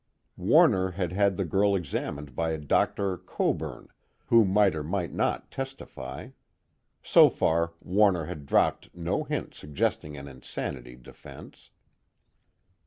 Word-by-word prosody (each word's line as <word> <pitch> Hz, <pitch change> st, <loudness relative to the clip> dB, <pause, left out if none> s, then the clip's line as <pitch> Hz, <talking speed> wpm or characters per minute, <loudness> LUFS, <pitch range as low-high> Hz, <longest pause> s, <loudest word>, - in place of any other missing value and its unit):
Warner 95 Hz, 0 st, +4 dB
had 90 Hz, -1 st, -3 dB
had 100 Hz, 0 st, +2 dB
the 95 Hz, -, -1 dB
girl 100 Hz, +4 st, +2 dB
examined 75 Hz, -5 st, -4 dB
by 80 Hz, +2 st, -1 dB
a -, -, -2 dB
Dr. 90 Hz, +5 st, 0 dB
Coburn, -, -, -3 dB, 0.4 s
who 115 Hz, -1 st, +5 dB
might 100 Hz, 0 st, +3 dB
or 75 Hz, -, -3 dB
might 90 Hz, +2 st, -3 dB
not -, -, -1 dB
testify; 130 Hz, -, -7 dB, 0.7 s
so -, -, +7 dB
far 85 Hz, +1 st, 0 dB
Warner 95 Hz, -3 st, +2 dB
had 75 Hz, -4 st, -8 dB
dropped -, -, +1 dB
no 85 Hz, -1 st, -2 dB
hint -, -, -4 dB
suggesting 75 Hz, 0 st, -3 dB
an 70 Hz, 0 st, -8 dB
insanity 65 Hz, -1 st, -7 dB
defense. 60 Hz, -, -14 dB
85 Hz, 125 wpm, -27 LUFS, 75-95 Hz, 0.7 s, so